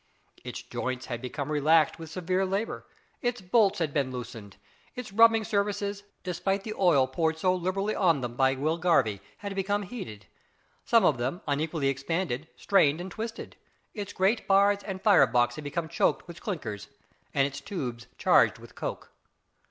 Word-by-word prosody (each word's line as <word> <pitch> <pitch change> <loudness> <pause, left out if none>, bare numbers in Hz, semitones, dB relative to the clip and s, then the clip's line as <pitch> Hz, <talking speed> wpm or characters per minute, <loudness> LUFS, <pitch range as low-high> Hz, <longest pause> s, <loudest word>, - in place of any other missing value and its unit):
Its - - -6
joints 130 0 -4
had 120 -2 -5
become 140 +3 -4
relaxed 155 +2 +3
with 160 -1 -8
severe 185 +2 -1
labour, 195 +4 -2 0.3
its 245 -1 -1
bolts 200 +1 +3
had 160 -4 -1
been 135 -3 0
loosened, 115 -5 -8 0.4
its 250 -5 -7
rubbing 225 +1 +6
surfaces, 200 -1 -1 0.2
despite 195 +2 -1
the 215 - -4
oil 170 -10 +4
poured 160 +4 -1
so 185 +3 +2
liberally 185 +4 -1
on 170 -7 +3
them 120 -1 -4
by 135 +1 +3
Will 155 +5 -1
Garvie, 130 - +2 0.2
had 200 - -3
become 200 +1 -1
heated. 120 - -8 0.6
Some 230 -4 +4
of 140 -7 +3
them, 130 +9 -2
unequally 150 0 0
expanded, 145 +1 -2
strained 160 -6 +3
and 180 +1 -6
twisted; 225 +4 -6 0.4
its 205 -2 -5
grate 195 +5 +1
bars 200 +1 +4
and 190 -2 -5
fire 205 -3 +6
box 120 -1 +2
had 155 - -8
become 160 +3 -3
choked 165 - 0
with 170 -1 -10
"clinkers," 110 - -5 0.5
and 135 - +4
its 140 0 -5
tubes 125 - -5
charged - - +4
with - - -14
coke. - - -6
170 Hz, 165 wpm, -28 LUFS, 135-200 Hz, 0.6 s, rubbing